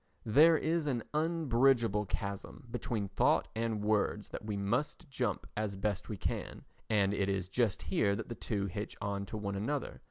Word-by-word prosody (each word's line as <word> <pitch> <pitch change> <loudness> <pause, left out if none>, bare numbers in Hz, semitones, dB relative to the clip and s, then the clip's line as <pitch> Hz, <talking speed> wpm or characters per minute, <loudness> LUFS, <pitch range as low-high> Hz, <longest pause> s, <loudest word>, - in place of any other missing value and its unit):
There 155 +8 +7
is 160 -1 0
an 120 -5 0
unbridgeable 135 - +2
chasm 100 +5 -5
between 115 -4 -2
thought 95 - +2
and 110 -2 -1
words 105 0 +1
that - - -6
we 105 -1 -3
must 120 - -1
jump 130 -1 -1
as 105 -2 -2
best 100 -1 -2
we 105 - -3
can, - - -3 0.3
and 100 -2 +3
it 100 -1 0
is 95 -2 -1
just 110 -2 +1
here 100 0 +2
that 110 - -5
the 120 - -4
two 105 -3 -2
hitch 100 +2 -5
on 100 -1 -2
to 110 - -5
one 100 -1 -3
another. 135 +8 -2
110 Hz, 180 wpm, -33 LUFS, 100-125 Hz, 0.3 s, There